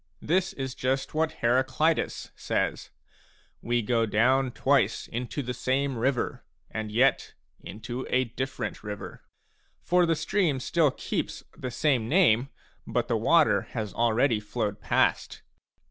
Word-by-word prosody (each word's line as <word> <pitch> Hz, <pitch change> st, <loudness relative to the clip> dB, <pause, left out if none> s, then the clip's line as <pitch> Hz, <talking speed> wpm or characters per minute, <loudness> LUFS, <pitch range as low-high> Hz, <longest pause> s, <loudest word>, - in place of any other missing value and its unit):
This 185 Hz, +4 st, +1 dB
is 135 Hz, -1 st, -4 dB
just 130 Hz, +1 st, -2 dB
what 160 Hz, +1 st, +1 dB
Heraclitus 130 Hz, +6 st, +1 dB
b -, -, -20 dB
says: -, -, -2 dB, 0.4 s
" -, -, -32 dB, 0.3 s
We 120 Hz, 0 st, 0 dB
go 115 Hz, +1 st, +1 dB
down 125 Hz, +5 st, +2 dB
twice -, -, +1 dB
into 125 Hz, +4 st, -4 dB
the 125 Hz, 0 st, -3 dB
same 130 Hz, +2 st, -1 dB
river, 125 Hz, +2 st, -1 dB, 0.3 s
and 110 Hz, -1 st, -4 dB
yet 125 Hz, +4 st, +2 dB, 0.2 s
into 120 Hz, +5 st, -7 dB
a 130 Hz, +1 st, +3 dB
different 125 Hz, -2 st, -5 dB
river." 105 Hz, -1 st, -7 dB, 0.6 s
For 180 Hz, -1 st, +3 dB
the 165 Hz, -, +2 dB
stream 170 Hz, -5 st, 0 dB
still 155 Hz, +3 st, +2 dB
keeps -, -, -4 dB
the 130 Hz, -, -5 dB
same 125 Hz, -4 st, +1 dB
name, 135 Hz, -, +4 dB, 0.4 s
but -, -, -1 dB
the -, -, +2 dB
water -, -, +3 dB
bas 105 Hz, -3 st, -3 dB
already 120 Hz, 0 st, +2 dB
flowed 105 Hz, -1 st, -3 dB
past. -, -, 0 dB
130 Hz, 140 wpm, -27 LUFS, 115-140 Hz, 0.6 s, name